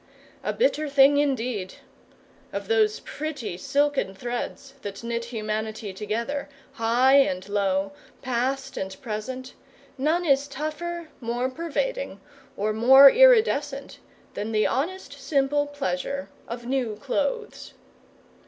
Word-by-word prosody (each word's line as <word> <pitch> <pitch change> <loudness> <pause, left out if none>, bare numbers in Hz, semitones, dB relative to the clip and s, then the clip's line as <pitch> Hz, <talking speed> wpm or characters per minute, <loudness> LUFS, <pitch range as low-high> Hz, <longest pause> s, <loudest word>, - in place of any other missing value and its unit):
A - - 0
bitter 310 -11 +1
thing 280 0 +6
indeed! 250 -9 -1 0.8
Of 200 -1 -5
those 215 -1 +2
pretty 280 - -5
silken 280 +1 0
threads 245 +5 -5
that 200 +2 -7
knit 235 0 -2
humanity 215 -2 -4
together, 230 +9 -3 0.2
high 245 +4 +4
and 185 -9 +2
low, 195 -1 0 0.3
past 265 +2 -2
and 190 0 -5
present, 255 +3 -5 0.5
none 320 +6 +1
is 280 -2 +3
tougher, 310 +4 -5
more 245 +1 -2
pervading, - - -3 0.4
or 215 +2 0
more 265 +5 +9
iridescent, 435 - +4 0.3
than 215 +2 -4
the 215 0 +3
honest, 325 +5 -2
simple 280 +1 +1
pleasure 280 0 -3 0.2
of 235 +1 -6
new 250 -4 -1
clothes. 285 - -3
260 Hz, 115 wpm, -25 LUFS, 215-285 Hz, 0.8 s, more